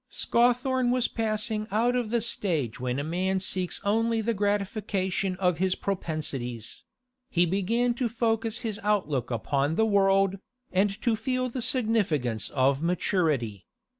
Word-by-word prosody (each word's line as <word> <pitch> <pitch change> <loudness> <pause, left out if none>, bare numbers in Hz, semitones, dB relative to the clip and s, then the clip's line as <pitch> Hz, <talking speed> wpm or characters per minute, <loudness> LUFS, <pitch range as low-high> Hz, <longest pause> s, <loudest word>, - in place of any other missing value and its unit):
Scawthorne 250 +1 +2
was 250 0 +2
passing 215 -1 -1
out 230 +5 +2
of 245 -3 -1
the 235 0 +1
stage 165 - -1
when 125 0 -2
a 140 - -1
man 185 +4 0
seeks 185 -1 -2
only 225 +2 +1
the 225 +1 0
gratification 200 -2 -1
of 180 -2 0
his 185 0 +1
propensities; 145 - -3 0.5
he 175 0 +3
began 225 +7 +1
to 240 0 -1
focus 225 0 0
his 225 -3 -3
outlook 155 - 0
upon 140 +5 0
the 220 - +3
world, 195 -2 +3 0.3
and 195 +2 +1
to 235 -2 +2
feel 255 +2 -1
the 250 +1 -4
significance 205 - +1
of 135 +1 +2
maturity. 155 - 0
200 Hz, 140 wpm, -27 LUFS, 165-225 Hz, 0.5 s, he